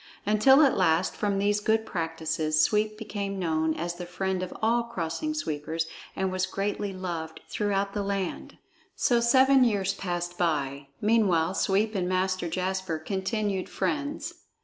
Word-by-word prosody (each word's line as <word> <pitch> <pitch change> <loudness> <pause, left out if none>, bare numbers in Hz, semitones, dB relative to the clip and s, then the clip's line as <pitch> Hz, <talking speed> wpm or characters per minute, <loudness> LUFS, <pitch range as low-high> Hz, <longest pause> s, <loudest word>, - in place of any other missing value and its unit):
Until 240 +8 +6
at 275 - +4
last 175 -1 +2
from 205 -1 0
these 205 +1 +2
good 220 +1 +1
practices 160 -3 -1
Sweep 215 0 +1
became 200 -2 -4
known 160 -3 0
as 170 +2 -3
the 175 0 -7
friend 185 +1 -2
of 185 - -4
all 235 +2 +2
Crossing 235 - -3
Sweepers, 160 - -2 0.3
and 190 -1 -1
was 185 0 0
greatly 200 +1 -2
loved 170 -4 -5
throughout 200 -1 -1
the 205 - -1
land. 195 -2 -3 0.4
So 240 -1 +3
seven 260 +3 +5
years 200 -5 +1
passed 175 -2 -4
by. 140 -4 -1
Meanwhile 195 -6 +3
Sweep 200 +3 +1
and 185 -3 -1
Master 185 -1 0
Jasper 185 -1 -2
continued 195 +3 -2
friends. 295 +3 -2
190 Hz, 150 wpm, -27 LUFS, 175-215 Hz, 0.4 s, Until